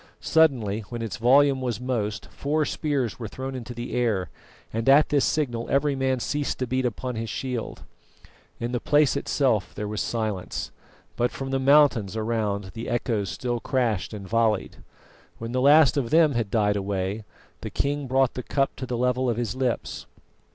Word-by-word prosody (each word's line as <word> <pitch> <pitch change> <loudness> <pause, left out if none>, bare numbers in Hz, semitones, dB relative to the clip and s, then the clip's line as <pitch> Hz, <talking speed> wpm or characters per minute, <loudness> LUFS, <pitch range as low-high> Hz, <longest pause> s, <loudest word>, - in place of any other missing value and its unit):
Suddenly, 125 -11 +2
when 120 -1 -4
its 110 -4 -4
volume 135 +3 +4
was 120 -4 -2
most, 115 -4 -2
four 150 +2 0
spears 140 -7 -2
were 115 - -4
thrown 130 +5 -6
into 125 -1 -7
the 120 +1 -6
air, 105 -10 0 0.4
and 115 +3 0
at 145 +3 +6
this 145 -2 +3
signal 120 -7 -1
every 140 +1 +2
man 130 -1 0
ceased 145 +4 -2
to 130 - -1
beat 130 +1 0
upon 125 +2 -4
his 115 0 -4
shield. 125 0 -4 0.8
In 120 +1 -3
the 125 - -1
place 145 +3 +3
itself 125 -8 0
there 105 - -4
was 105 0 -3
silence, 110 -5 -3 0.4
but 120 +1 +1
from 135 0 -6
the 135 - +1
mountains 135 -7 +4
around 105 -3 -2
the 115 0 -6
echoes 115 -4 -1
still 120 -1 -2
crashed 115 -7 -1
and 100 -3 -7
volleyed. 115 0 +1 0.6
When 115 +1 -6
the 125 +1 0
last 145 -1 +6
of 125 -5 0
them 160 -1 +5
had 115 -5 -1
died 105 -1 +2
away, 100 +1 -2 0.4
the - - -6
king 145 0 -2
brought 130 0 +2
the 125 - -4
cup 135 +2 -1
to 130 - -5
the 120 - -2
level 125 +1 +1
of 115 - -1
his 120 -3 -2
lips. 130 -2 -2
120 Hz, 180 wpm, -25 LUFS, 110-135 Hz, 0.8 s, at